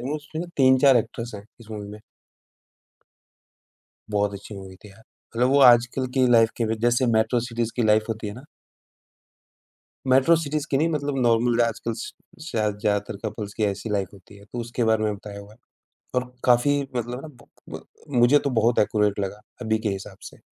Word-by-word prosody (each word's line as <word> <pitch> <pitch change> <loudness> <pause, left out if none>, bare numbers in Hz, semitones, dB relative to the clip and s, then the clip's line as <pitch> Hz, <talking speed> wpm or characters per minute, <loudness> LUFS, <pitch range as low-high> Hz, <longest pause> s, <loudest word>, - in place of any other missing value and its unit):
रहा 125 - -5
है, 150 - -2
मतलब - - 0
उसमें 155 +3 -7
3-4 130 0 +5
एक्ट्रेस 115 +1 -2
हैं, 100 - -9 0.2
इस 110 -1 -14
मूवी 105 -1 -6
में। 105 +1 -9 2.1
बहुत 100 -1 0
अच्छी 100 +1 -9
मूवी 95 -1 -10
थी 105 +2 -15
यार, 105 +3 -19 0.3
मतलब 125 +2 +2
वो 140 +1 +4
आजकल 120 +2 +2
की 130 -2 +3
लाइफ 115 -1 +5
के 110 -1 +1
जैसे 120 +2 +2
मेट्रो 110 +2 +2
सिटीज़ 115 -1 -2
की 120 - +1
लाइफ 110 0 +3
होती 110 -1 -4
है 100 - -7
ना। 125 - -11 1.6
मेट्रो 135 +6 +5
सिटीज़ 155 -2 -3
की 135 - +2
नहीं 160 +4 +2
मतलब 145 -3 -2
नॉर्मल 120 0 +2
आजकल 115 0 -1
श - - -7 0.4
शायद 105 -2 -1
ज़्यादातर 105 -1 -1
कपल्स 105 -1 -5
की 110 - -3
ऐसी 100 +2 -3
लाइफ 100 -3 -1
होती 100 +1 -16
है 100 - -16
तो 110 +4 -9
उसके 120 +1 -2
बारे 110 -1 +2
में 105 - 0
बताया 100 0 -9
हुआ 100 +1 -14
है। 110 - -21 0.6
और 125 0 -1
काफ़ी 130 +4 +4 0.2
मतलब 120 +1 -3
है 130 - -7
ना - - -9 0.2
ब - - -24 0.3
ब - - -17 0.3
मुझे 120 +5 +5
तो 140 - -2
बहुत 115 +2 +2
एक्यूरेट 105 -1 +1
लगा, 100 +1 -4 0.2
अभी 110 -2 0
के 110 - -2
हिसाब 100 0 -6
से। - - -11
115 Hz, 200 wpm, -24 LUFS, 105-125 Hz, 2.1 s, 3-4